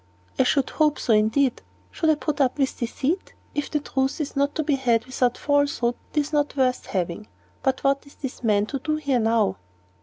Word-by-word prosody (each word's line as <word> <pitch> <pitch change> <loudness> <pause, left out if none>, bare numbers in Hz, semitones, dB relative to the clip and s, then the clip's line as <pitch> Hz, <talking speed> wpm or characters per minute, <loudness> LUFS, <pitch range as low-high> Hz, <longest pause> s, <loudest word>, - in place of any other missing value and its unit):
"I - - +7
should 275 0 +2
hope 305 -2 +2
so, 230 - +1
indeed. 220 +5 +2 0.3
Should 320 - 0
I 310 - +5
put 295 -1 -2
up 260 0 +2
with 270 -2 0
deceit? 270 +9 -2 0.2
If 290 - -2
the 300 - 0
truth 270 -1 -1
is 295 -2 -3
not 280 +1 +1
to 315 - 0
be 295 0 +1
had 240 -4 +2
without 250 -1 0
falsehood, 285 -4 +1 0.2
it 300 - +4
is 290 +2 -6
not 290 -1 +1
worth 255 -1 +1
having. 180 +2 -3 0.3
But 265 -1 0
what 275 +1 +1
is 280 - -16
this 265 -2 -6
man 210 -2 +3
to 275 +5 -4
do 305 +3 -1
here 280 -5 0
now?" 225 - +2
275 Hz, 210 wpm, -24 LUFS, 240-290 Hz, 0.3 s, I